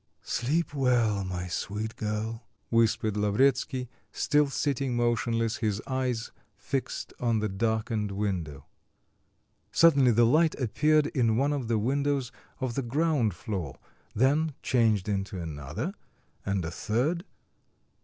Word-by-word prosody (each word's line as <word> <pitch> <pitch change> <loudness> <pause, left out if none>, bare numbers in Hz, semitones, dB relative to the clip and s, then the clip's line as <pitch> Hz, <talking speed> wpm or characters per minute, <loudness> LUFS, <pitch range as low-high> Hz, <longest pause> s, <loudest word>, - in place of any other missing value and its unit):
"Sleep 150 +7 -1
well, 120 -7 +2
my 90 -1 -4
sweet 105 +5 -3
girl," 110 +2 -3 0.3
whispered 110 -2 +2
Lavretsky, 125 +5 +1 0.2
still 150 -1 +2
sitting 135 -2 -1
motionless, 115 -1 +1
his 105 -3 -1
eyes 130 -3 -2 0.2
fixed 135 +5 -4
on 120 -2 +1
the 110 0 0
darkened 110 +1 -1
window. 95 -8 -3 1.1
Suddenly 140 -6 +5
the 120 0 +5
light 155 +7 +4
appeared 150 +5 +3
in 115 -7 +1
one 140 +3 +2
of 135 -5 -3
the 115 -1 +1
windows 135 +3 0 0.3
of 130 -3 -2
the 135 - -1
ground 135 - +1
floor, 90 -7 -5 0.4
then 145 +5 +2
changed 110 -5 +2
into 100 -2 -2
another, 80 - -4 0.5
and 95 -3 0
a 80 - -4
third.... 130 - -1
115 Hz, 125 wpm, -28 LUFS, 105-135 Hz, 1.1 s, Suddenly